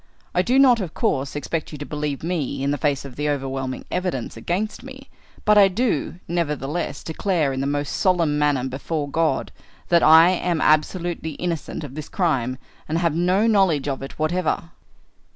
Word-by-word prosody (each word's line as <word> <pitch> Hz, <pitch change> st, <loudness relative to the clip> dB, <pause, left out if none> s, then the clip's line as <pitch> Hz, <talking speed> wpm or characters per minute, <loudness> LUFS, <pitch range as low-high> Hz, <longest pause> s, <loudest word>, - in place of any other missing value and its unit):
I 180 Hz, -, +3 dB
do 245 Hz, +8 st, +2 dB
not, 255 Hz, -4 st, +6 dB
of 175 Hz, -5 st, -6 dB
course, 135 Hz, +1 st, -1 dB
expect 150 Hz, +2 st, -3 dB
you 150 Hz, -, -7 dB
to 145 Hz, -, -6 dB
believe 150 Hz, -2 st, -4 dB
me 160 Hz, -6 st, -2 dB
in 140 Hz, -, +1 dB
the 145 Hz, -, -2 dB
face 140 Hz, -3 st, 0 dB
of 130 Hz, -3 st, -10 dB
the 150 Hz, 0 st, -1 dB
overwhelming 135 Hz, -2 st, -3 dB
evidence 180 Hz, -10 st, -2 dB
against 180 Hz, -, -3 dB
me, 265 Hz, +1 st, -12 dB, 0.3 s
but 210 Hz, 0 st, +6 dB
I 200 Hz, -, +8 dB
do, 195 Hz, -, -1 dB
nevertheless, 155 Hz, -2 st, -2 dB
declare 160 Hz, -4 st, 0 dB
in 130 Hz, -, -2 dB
the 135 Hz, -, -1 dB
most 145 Hz, 0 st, -1 dB
solemn 170 Hz, -6 st, +2 dB
manner 145 Hz, -3 st, +1 dB
before 145 Hz, +3 st, -3 dB
God, 155 Hz, -2 st, 0 dB, 0.4 s
that 170 Hz, -1 st, +5 dB
I 160 Hz, +3 st, +8 dB
am 175 Hz, -2 st, 0 dB
absolutely 160 Hz, +1 st, +1 dB
innocent 170 Hz, -1 st, -4 dB
of 140 Hz, -3 st, -8 dB
this 150 Hz, 0 st, -7 dB
crime 130 Hz, -, 0 dB, 0.3 s
and 160 Hz, -, 0 dB
have 170 Hz, -2 st, +1 dB
no 180 Hz, +6 st, +2 dB
knowledge 190 Hz, -10 st, +3 dB
of 135 Hz, -2 st, -2 dB
it 135 Hz, -, -8 dB
whatever." 165 Hz, +1 st, -1 dB
155 Hz, 180 wpm, -22 LUFS, 140-180 Hz, 0.4 s, I